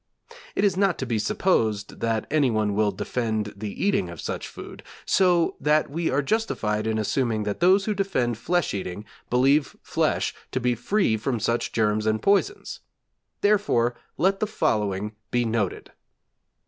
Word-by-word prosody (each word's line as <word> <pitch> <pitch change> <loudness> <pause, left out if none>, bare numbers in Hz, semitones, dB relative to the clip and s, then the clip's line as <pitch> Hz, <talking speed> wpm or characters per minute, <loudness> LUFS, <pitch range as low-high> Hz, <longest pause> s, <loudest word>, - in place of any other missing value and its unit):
It - - +1
is 200 -3 +3
not 195 -2 +2
to 130 - -3
be 115 -3 -1
supposed 110 - 0
that 115 -2 0
anyone 115 -9 +2
will 105 +1 +2
defend 110 +1 -2
the 105 - -4
eating 200 - +1
of 85 -2 -9
such - - -4
food, - - -10 0.2
so 180 -3 +3
that 150 -1 +2
we 165 +2 -1
are 140 +2 +1
justified 110 - -1
in 110 0 0
assuming 110 0 0
that 105 -1 -3
those 190 +3 +4
who 215 - 0
defend 130 - -1
flesh 175 +5 0
eating 95 +1 -5 0.2
believe 135 +4 +2
flesh - - 0 0.2
to 130 - +1
be 125 0 +1
free 180 - +1
from 120 +2 -2
such 115 +3 -1
germs 110 -1 +1
and 110 0 +2
poisons; 205 - 0 0.6
therefore 200 - +2 0.2
let 195 +3 +2
the 215 - 0
following 105 - 0 0.2
be 120 -1 +1
noted. 110 -4 -2
120 Hz, 160 wpm, -25 LUFS, 110-180 Hz, 0.6 s, those